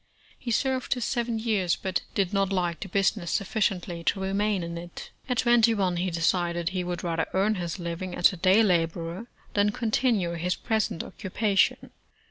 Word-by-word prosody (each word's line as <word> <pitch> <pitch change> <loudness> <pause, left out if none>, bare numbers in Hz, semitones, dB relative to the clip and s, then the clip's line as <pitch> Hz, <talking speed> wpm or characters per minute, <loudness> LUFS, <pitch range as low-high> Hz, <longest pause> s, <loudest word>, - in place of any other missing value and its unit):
He 250 - -6
served 260 +2 0
his 245 -2 -2
seven 235 -2 -1
vears, 205 -6 +1
but 190 -1 -2
did 195 -1 0
not 195 -1 +1
like 175 -3 0
the 195 - -6
business 195 -1 +1
sufficiently 185 -4 -1
to 195 - +1
remain 195 0 0
in 170 0 -5
it. 175 0 -8 0.2
At 250 - 0
twenty 235 -1 +4
one, 185 -4 0
he 185 +2 0
decide^* 170 0 0
he 185 -1 -2
would 175 0 -4
rather 165 -2 -1
earn 200 +3 +3
his 175 -3 -4
living 175 +1 -5
as 175 - +4
a - - -7
day 190 +5 +5
laborer, 170 +2 0 0.3
than 205 0 +3
continue 220 -4 +1
his 175 +2 -1
present 220 -6 -1
occupation. 200 0 0
190 Hz, 175 wpm, -27 LUFS, 175-215 Hz, 0.3 s, day